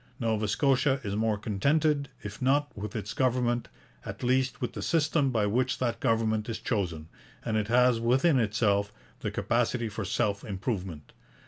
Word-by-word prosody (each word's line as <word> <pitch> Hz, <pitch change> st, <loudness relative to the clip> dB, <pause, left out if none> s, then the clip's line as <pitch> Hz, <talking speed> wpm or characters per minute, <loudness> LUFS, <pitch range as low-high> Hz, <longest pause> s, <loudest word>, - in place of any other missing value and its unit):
Nova 110 Hz, -3 st, 0 dB
Scotia 135 Hz, +4 st, +2 dB
is 100 Hz, -2 st, -3 dB
more 110 Hz, 0 st, +1 dB
contented, 140 Hz, +8 st, +1 dB
if 105 Hz, 0 st, -7 dB
not 145 Hz, +3 st, +1 dB
with 105 Hz, +1 st, -6 dB
its 105 Hz, -1 st, -4 dB
government, 125 Hz, -2 st, +1 dB, 0.4 s
at -, -, -7 dB
least 130 Hz, +1 st, +1 dB
with 125 Hz, -, -3 dB
the 105 Hz, -, -5 dB
system 150 Hz, +4 st, +2 dB
by 110 Hz, -5 st, +1 dB
which 125 Hz, +4 st, +1 dB
that 120 Hz, -2 st, -1 dB
government 110 Hz, -2 st, +1 dB
is 115 Hz, -, -2 dB
chosen, 85 Hz, -8 st, -2 dB, 0.4 s
and 110 Hz, -, -1 dB
it 105 Hz, -1 st, 0 dB
has 125 Hz, 0 st, +4 dB
within 130 Hz, +5 st, +3 dB
itself 105 Hz, -2 st, +1 dB, 0.3 s
the -, -, -2 dB
capacity 120 Hz, -1 st, 0 dB
for 110 Hz, +1 st, -5 dB
self 100 Hz, +1 st, -1 dB
improvement. 95 Hz, -, -4 dB
115 Hz, 160 wpm, -28 LUFS, 105-130 Hz, 0.4 s, has